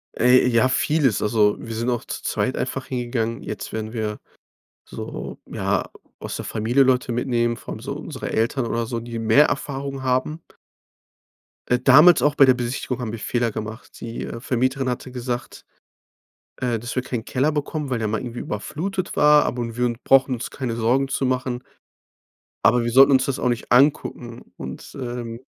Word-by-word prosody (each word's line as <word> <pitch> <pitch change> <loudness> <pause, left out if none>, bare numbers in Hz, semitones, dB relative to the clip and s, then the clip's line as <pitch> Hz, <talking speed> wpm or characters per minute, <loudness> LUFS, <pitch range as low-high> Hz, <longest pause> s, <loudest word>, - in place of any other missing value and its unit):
Ey, 125 +1 +5
ja, 120 +1 +3
vieles. 140 -4 +2
Also, 105 -1 +3
wir 115 -1 -6
sind 115 +2 -1
auch 120 -2 -1
zu - - -6
zweit 130 - -1
einfach 130 +1 -3
hingegangen. 120 -2 -2
Jetzt 105 - -6
werden 110 0 -5
wir 110 -2 -3 0.7
so, - - -7
ja, - - -1 0.3
aus - - -6
der - - -5
Familie 115 +5 +2
Leute 125 -2 +2
mitnehmen, 120 -1 0
vor - - -8
allem - - -7
so - - -5
unsere - - -6
Eltern 120 +3 0
oder 115 0 -1
so, 115 +1 -3
die 115 0 -6
mehr 115 +7 +5
Erfahrung 135 -1 -4
haben. 130 +5 0 1.3
Äh, 125 - +2
damals 150 +7 +7
auch 145 0 +2
bei 140 - +7
der 130 - +6
Besichtigung 125 +1 -3
haben 120 -3 -3
wir 115 - -6
Fehler 120 +1 0
gemacht. 110 +2 -8
Die, 115 0 -5
äh, - - -6
Vermieterin 130 +2 0
hatte 125 +1 -4
gesagt, 125 -1 -5 0.9
äh, 120 -3 -1
dass 120 +2 -6
wir 130 - 0
keinen 120 -3 -4
Keller 135 +6 0
bekommen, 150 -1 -3
weil 125 - 0
der 110 -1 -1
mal 110 +1 -1
irgendwie 120 -1 -6
überflutet 180 - -4
war, 150 0 +6
aber 115 -2 -3
wir 125 - +1
un 120 -1 -2
brauchen 135 -1 +4
uns 120 - -5
keine 125 -4 -4
Sorgen 125 +4 +1
zu 135 0 -1
machen 125 -1 -1 1.0
aber 120 +1 +4
wir 120 - -1
sollten 135 +3 +7
uns 130 -1 +4
das 140 - -2
auch - - +1
nicht 120 -1 -3
angucken 125 -3 +1
und, 65 0 -8
ähm 120 -2 -5
125 Hz, 185 wpm, -22 LUFS, 115-130 Hz, 1.3 s, damals